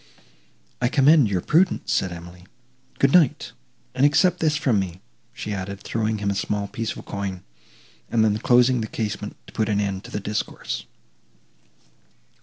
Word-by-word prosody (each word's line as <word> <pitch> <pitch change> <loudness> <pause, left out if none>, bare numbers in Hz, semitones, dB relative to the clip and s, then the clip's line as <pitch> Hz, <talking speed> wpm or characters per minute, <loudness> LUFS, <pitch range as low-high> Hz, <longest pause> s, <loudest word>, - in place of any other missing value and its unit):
"I 120 - +3
commend 140 -1 +5
your 95 -3 0
prudence," 175 - +2
said 95 - 0
Emily. 85 +1 -11 0.5
"Good 135 0 +3
night, 165 -7 +3 0.4
and 130 +1 0
accept 180 +5 +4
this 155 -2 +2
from 130 -9 +2
me," 90 -2 -4 0.3
she 115 -3 -5
added, 100 0 -5
throwing 110 -1 -1
him 100 -1 -1
a - - 0
small 100 +1 -2
piece 115 +2 -4
of - - -10
coin, 100 -3 -5 0.7
and 110 -2 +3
then 105 0 +1
closing 125 +1 +4
the 110 - -3
casement 110 -1 -4
to - - -15
put 110 -1 0
an 100 -1 +1
end 100 -1 -2
to - - -9
the - - -3
discourse. 105 +1 -4
110 Hz, 165 wpm, -23 LUFS, 100-130 Hz, 0.7 s, commend